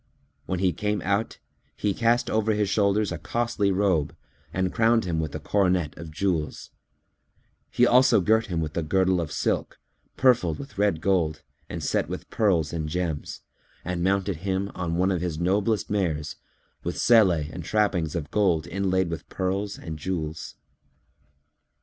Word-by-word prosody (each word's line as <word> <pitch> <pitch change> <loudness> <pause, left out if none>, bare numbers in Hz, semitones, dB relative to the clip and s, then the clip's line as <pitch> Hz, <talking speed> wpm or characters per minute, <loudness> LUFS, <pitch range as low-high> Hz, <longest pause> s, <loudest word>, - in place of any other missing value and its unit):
When 95 - -1
he 90 -1 +1
came 105 +5 -1
out, 100 +3 -1 0.4
he 105 -1 0
cast 115 +3 +2
over 110 0 +1
his 105 -1 +1
shoulders 100 0 +2
a 85 - -4
costly 115 -3 0
robe 95 -6 +1 0.4
and 95 0 -1
crowned 115 -1 +3
him 85 -3 -1
with 80 -2 -3
a - - -3
coronet 90 -2 +1
of 85 -1 -8
jewels; 80 -1 -2 1.0
he 120 - +3
also 125 -1 +5
girt 110 +4 +2
him 85 -4 -2
with 80 -1 -4
a 85 - 0
girdle 95 +2 +2
of 80 -3 -5
silk, - - -1 0.4
purfled 120 - +3
with 140 -7 -9
red 100 -6 +2
gold 85 -5 +1 0.3
and - - -5
set - - 0
with - - -7
pearls 85 -9 +1
and 80 -2 -3
gems, 85 -2 -3 0.4
and 90 -1 -2
mounted 95 -1 +1
him 95 +3 -2
on 85 -2 -3
one 95 +3 +2
of 90 -3 -1
his 85 -3 -2
noblest 100 +4 +1
mares, 80 -7 -1 0.5
with - - -3
selle 115 -5 +6
and 80 0 -3
trappings 90 -5 0
of 80 -4 -4
gold 90 -7 +2
inlaid 95 -1 0
with 85 -3 -6
pearls 95 +2 -2
and 80 -2 -7
jewels. 80 -2 -4
95 Hz, 160 wpm, -25 LUFS, 80-105 Hz, 1.0 s, selle